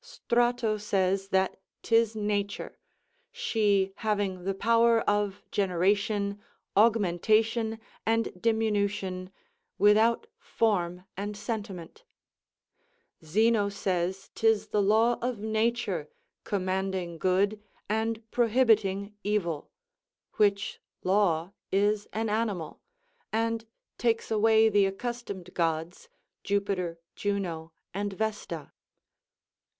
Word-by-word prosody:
Strato 240 - 0
says 195 -2 0
that 190 -1 +1 0.2
'tis 225 -1 +3
nature, 205 -1 -2 0.5
she 210 - +1
having 200 -4 -1
the 195 0 -1
power 230 +2 +4
of 205 -1 0
generation, 200 +2 +1 0.3
augmentation, 220 +2 +3 0.3
and 225 -5 0
diminution, 200 -4 0 0.5
without 215 +3 +4
form 180 -5 0
and 205 +2 -4
sentiment 205 - -6 1.2
Zeno 210 +5 +2
says 190 -1 -2
'tis 225 -2 +2
the 210 - +2
law 220 +4 +3
of 245 -1 -1
nature, 220 -6 -1 0.4
commanding 185 -3 -2
good 200 +4 +1 0.3
and 220 +1 -1
prohibiting 220 -4 +2
evil; 175 -7 -1 0.7
which 200 -1 +1 0.2
law 185 -3 +2 0.2
is 205 +1 +2
an 225 +1 -1
animal; 210 -7 -2 0.5
and 225 0 -1 0.3
takes 230 -2 0
away 220 0 +5
the 205 -2 +4
accustomed 200 -3 -5
gods, 165 - -2 0.3
Jupiter, 195 -4 -1 0.2
Juno, 175 -6 -2 0.2
and 200 +1 -2
Vesta. 200 -7 -4
205 Hz, 90 wpm, -28 LUFS, 190-225 Hz, 1.2 s, away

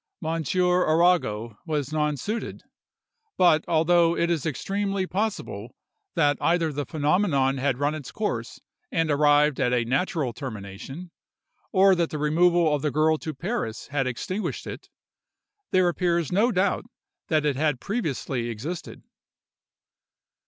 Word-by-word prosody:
Monsieur 180 +3 +1
Arago 155 -11 +2
was 150 -4 -2
nonsuited; 150 - -2 0.7
but 165 -4 +5
although 170 +1 +3
it 170 +1 +1
is 160 -3 -1
extremely 195 +5 -2
possible 205 +4 -3 0.4
that 145 -3 +2
either 165 -2 +1
the 145 -1 -3
phenomenon 150 -4 +1
had 135 -1 0
run 145 +2 0
its 155 -5 -7
course 215 -1 -3 0.3
and 165 -8 +1
arrived 145 0 +4
at 125 - +2
a 120 -2 +1
natural 140 0 -1
termination, 125 - -8 0.6
or 195 -1 +5
that 170 -2 +1
the 155 - -4
removal 165 +2 +3
of 145 - 0
the 150 - 0
girl 155 +2 +2
to 160 - -4
Paris 175 - -4
had 135 -2 0
extinguished 185 - -3
it, - - -8 0.8
there 185 -1 +3
appears 170 -3 0
no 215 +7 +3
doubt 190 0 +1 0.4
that 155 -2 +1
it 145 -2 +1
had 145 -2 0
previously 135 - -2
existed. 145 +11 -6
155 Hz, 130 wpm, -25 LUFS, 140-180 Hz, 0.8 s, but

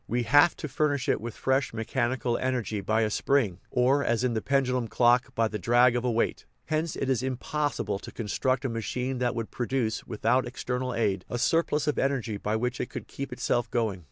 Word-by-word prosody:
We 120 +1 0
have 145 +8 +5
to - - -5
furnish 145 -1 0
it - - +1
with 115 0 -6
fresh 130 -2 0
mechanical 120 +2 -1
energy 125 -5 -1
by 110 +3 +1
a 110 -1 +1
spring 110 -8 +1
(or, 130 +3 +3
as 120 -1 +1
in 125 -2 +1
the 110 - -1
pendulum 130 -3 +1
clock, 120 +2 +3
by 115 0 +2
the 105 -1 -5
drag 120 +5 +4
of 120 - 0
a 125 - +1
weight). 115 0 -1 0.2
Hence 155 +1 -1
it 135 - -2
is 130 -3 +1
impossi 140 +3 -2
ble 100 - -2
to - - -9
construct 130 +4 -1
a - - 0
machine 125 +3 -3
that 125 -1 0
would 115 -2 -4
produce, 120 -2 -1
with 110 - -8
out 130 0 +3
external 125 0 -3
aid, 100 -5 0
a 120 - -2
surplus 150 +2 +1
of 150 - 0
energy 130 -6 0
by 105 +2 -2
which 125 +3 -1
it - - -4
could - - -7
keep 140 - -6
itself 120 - -1
going. 110 -6 -1
125 Hz, 215 wpm, -27 LUFS, 115-130 Hz, 0.2 s, have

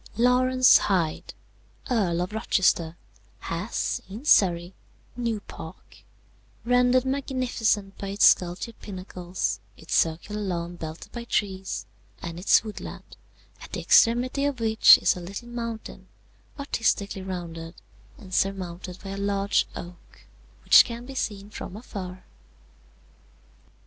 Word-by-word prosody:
"Laurence 255 +1 +5
Hyde, 170 -5 -1 0.5
Earl 185 -9 +1
of 185 - -7
Rochester, 175 -6 +1 0.4
has, 170 +7 -3
in 220 +8 -8
Surrey, 175 - +4 0.4
New 230 -3 -2
Park, - - -11 0.7
rendered 250 +1 +3
magnificent 255 -7 -1
by 200 - -5
its 200 +1 +3
sculptured 180 +6 +2
pinnacles, 185 -2 -4 0.2
its 160 - -7
circular 170 +6 0
lawn 175 -3 -3
belted 160 -1 -8
by 235 -1 -7
trees, 190 -4 -2 0.3
and 170 0 -6
its 190 - +4
woodland, 215 -2 -9 0.5
at - - -12
the - - -2
extremity 245 +4 +4
of 285 -4 -1
which 220 -1 +7
is - - +2
a - - -6
little 200 +7 -8
mountain, 230 -2 -6 0.5
artistically 225 -8 -1
rounded, 170 -3 -6 0.4
and 185 -4 -12
surmounted 185 -2 -2
by 195 - -6
a 195 - -5
large 200 0 +1
oak, 175 0 -11 0.4
which - - +8
can 235 +1 -7
be 270 - -8
seen 205 -5 -4
from 200 - -7
afar. 185 -5 -8
200 Hz, 120 wpm, -26 LUFS, 180-235 Hz, 0.7 s, which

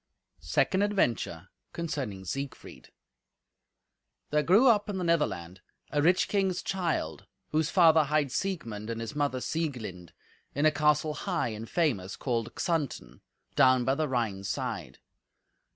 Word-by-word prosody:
Second 80 - +1
Adventure 120 - 0 0.2
Concerning 130 - -4
Siegfried 135 +8 -6 1.4
There 150 0 +3
grew 195 - +5
up 210 -3 +4
in 200 - -2
the 185 - -2
Netherland 95 - -1 0.3
a 145 - +1
rich 175 +4 +3
king's 195 -3 0
child, 180 -4 -2 0.2
whose 155 +1 +1
father 160 -4 +5
hight 145 -2 +1
Siegmund 115 - -3
and 115 0 -3
his 115 +2 -5
mother 145 -3 0
Sieglind, 120 - -4 0.4
in 145 +3 +1
a 155 - +6
castle 150 0 +2
high 175 -6 -1
and 110 +1 -7
famous 120 - 0
called 115 -4 -2
Xanten, 165 -7 -2 0.3
down 130 -1 +5
by 130 - +3
the 155 +2 0
Rhine's 110 -7 -2
side. - - -4
145 Hz, 135 wpm, -29 LUFS, 115-170 Hz, 1.4 s, a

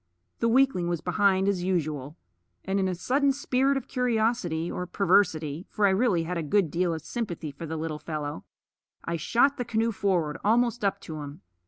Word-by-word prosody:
The 230 - +2
weakling 250 -8 +3
was 175 -1 -1
behind 190 +2 +2
as 195 -3 +1
usual; 155 -5 -2 0.5
and 195 +1 0
in 190 - +1
a 185 - -1
sudden 275 +9 +2
spirit 270 0 +1
of 265 -1 -5
curiosity 225 -9 0
or 180 - -4
perversity 170 -4 +1
for 210 - +1
I 195 - +5
really 190 -4 +2
had 175 +1 -3
a - - -1
good 165 +1 +1
deal 175 +2 +1
of 160 - -7
sympathy 170 -8 -4
for 155 +4 -8
the 160 +1 -4
little 155 -1 -4
fellow 150 - -5 0.6
I 170 - -2
shot 245 - +2
the 250 - -1
canoe 230 -1 0
forward, 180 -8 0
almost 235 +2 +2
up 200 - +1
to 155 -2 -7
him. 145 0 -9
185 Hz, 190 wpm, -27 LUFS, 160-230 Hz, 0.6 s, I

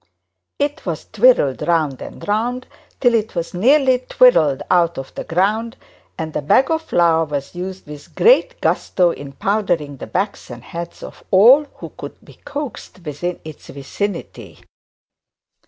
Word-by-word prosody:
It 290 +2 -2
was 170 -4 -4
twirled 215 - +3
round 155 -6 0
and - - -9
round 240 +5 -1 0.3
till 245 -2 +3
it 220 -1 -1
was 170 -1 -3
nearly 260 +6 +3
twisted 170 - +3
out 170 -2 +3
of 135 - -7
the - - -6
ground; 215 +8 -1 0.4
and 160 -1 -5
the - - -2
bag 260 - +3
of 320 0 +1
flour 170 - +2
was 145 -2 -5
used 185 +1 -7
with 150 -1 -12
great - - +4
gusto 180 -2 +1
in 140 -3 -9
powdering 175 -7 -1
the - - -8
backs 200 +2 -3
and 120 -1 -9
heads 170 +4 -8
of - - -10
all 245 +10 +6
who - - -9
could - - -9
be - - -17
coaxed 280 - -7
within 165 +4 -4
the 155 - -6 0.2
vicinity. 135 - -6
180 Hz, 155 wpm, -19 LUFS, 155-240 Hz, 0.4 s, all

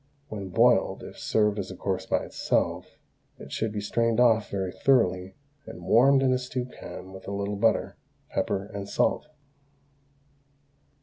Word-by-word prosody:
When 100 -3 -6
boiled, - - +3
if - - -10
served 105 -1 +1
as 95 - -4
a 95 - -7
course 95 0 -3
by - - 0
itself, - - -1 0.4
it - - -11
should 110 -1 -1
be 105 - -3
strained 115 +2 +1
off 115 -3 +4
very 95 -2 -2
thoroughly 95 -9 +2 0.3
and 110 - -9
warmed 135 +4 +5
in 130 -1 +3
a 125 - +1
stew 125 0 -4
pan 95 -6 -10
with 95 - -11
a - - -4
little 100 +1 -2
butter, 110 +3 +1 0.3
pepper, 95 0 -1
and 100 0 -6
salt. - - +1
105 Hz, 160 wpm, -27 LUFS, 95-120 Hz, 0.4 s, warmed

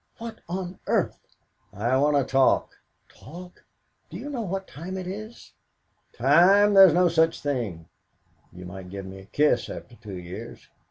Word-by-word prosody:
What 230 -1 -8
on 180 0 -5
earth - - 0 0.4
" - - -42
"I 115 +6 0
want 145 +1 +3
to 140 - +3
talk." 135 0 +2 0.4
"Talk? 175 +5 -13 0.5
Do - - -8
you 290 - -7
know 255 -4 -3
what 195 -2 -4
time 180 +6 -7
it 185 - -5
is?" 215 +5 -9 0.6
"Time 185 - +5
there's 190 -5 +8
no 180 0 +4
such 165 -1 +2
thing. 115 - -3 0.6
You 90 0 -11
might 90 +1 -9
give 100 0 -7
me 95 0 -9
a 95 - -13
kiss 150 +9 +1
after 120 - -9
two 105 -5 -9
years. 90 0 -9
150 Hz, 165 wpm, -25 LUFS, -, 0.6 s, there's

